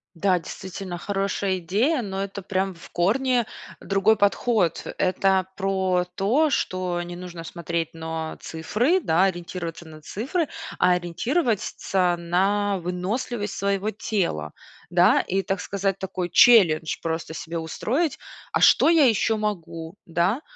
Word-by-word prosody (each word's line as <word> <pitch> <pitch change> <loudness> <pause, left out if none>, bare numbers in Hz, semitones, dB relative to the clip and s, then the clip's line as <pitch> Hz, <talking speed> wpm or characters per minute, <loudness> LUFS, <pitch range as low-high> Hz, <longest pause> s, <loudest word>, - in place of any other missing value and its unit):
Да, 180 +2 +2
действительно, 185 +1 -7
хорошая 195 0 -1
идея, 230 - +1
но 195 -3 -4
это 200 0 -5
прям 190 0 -1
в 165 - -14
корне 240 +6 +2 0.3
другой 195 +3 +2
подход. 205 -2 +1
Это 190 0 +2
про 190 -2 +1
то, 250 +11 +2
что 185 -7 -1
не 175 0 -6
нужно 175 -2 -8
смотреть 170 -1 -3
но 160 -1 -5
цифры, 230 - 0
да, 175 - +2
ориентироваться 175 -2 -3
на 155 -1 -12
цифры, 275 - -2 0.3
а 180 - +5
ориентировать 210 - 0
ться 180 -2 0
на 195 +4 +1
выносливость 205 +5 -3
своего 200 +1 0
тела, 175 - -2 0.4
да. - - +5
И, 195 +1 -1
так 195 -1 -2
сказать, 195 -1 -1
такой 185 -2 -4
челлендж 170 -9 +5
просто 160 0 -3
себе 165 +1 -5
устроить: 255 - -1 0.3
"А - - +1
что - - +6
я 325 -4 +6
еще 225 -1 +2
могу?", 170 -4 -4
да. 175 - 0
190 Hz, 135 wpm, -24 LUFS, 175-210 Hz, 0.4 s, что